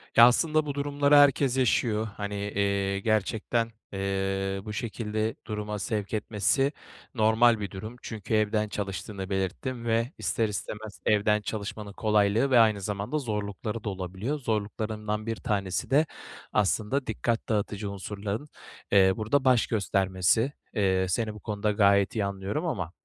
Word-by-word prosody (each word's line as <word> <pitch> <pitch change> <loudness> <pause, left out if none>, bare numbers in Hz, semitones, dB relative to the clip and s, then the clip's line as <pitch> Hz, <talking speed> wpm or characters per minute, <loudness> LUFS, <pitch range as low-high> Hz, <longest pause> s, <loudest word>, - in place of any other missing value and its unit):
Ya 115 - +10
,aslında 155 +4 +2
bu 145 - -3
durumları 145 0 +2
herkes 140 -2 +5
yaşıyor. 110 -3 +2
Hani, 100 0 -4
eee, 100 -1 0
gerçekten, 110 +2 0 0.2
eee, 95 0 -1
bu 105 - -5
şekilde 110 -1 -2
duruma 105 -1 -4
sevk 105 +1 -3
etmesi 110 +6 +1 0.4
normal 110 0 +4
bir 100 -3 -4
durum. 110 +5 -7
Çünkü 110 -1 -5
evden 105 0 +2
çalıştığını 100 -1 -5
belirttin 105 +6 -3
ve 115 +2 +1
ister 115 - 0
istemez 105 +1 -6
evden 105 0 +3
çalışmanın 105 0 -5
kolaylığı 105 +5 +2
ve 125 - +7
aynı 110 -3 +4
zamanda 105 +8 -2
zorlukları 105 -3 -3
da 105 - -2
olabiliyor. 95 - -4
Zorluklarından 105 -2 -2
bir 115 0 -2
tanesi 100 -3 -2
de 150 +4 +4 0.5
aslında 110 +6 +1
dikkat 115 +1 -1
dağıtıcı 105 -1 -1
unsurların, 100 +6 -5 0.4
eee, 95 -1 +6
burada 130 +6 +1
baş 125 -3 +4
göstermesi. 95 +3 +1 0.2
Eee, 95 -3 +2
seni 110 +4 0
bu 105 - -10
konuda 105 0 -1
gayet 100 -1 +3
iyi 105 -3 +1
anlıyorum 100 - -3
ama, 90 - -2
105 Hz, 140 wpm, -27 LUFS, 100-115 Hz, 0.5 s, Ya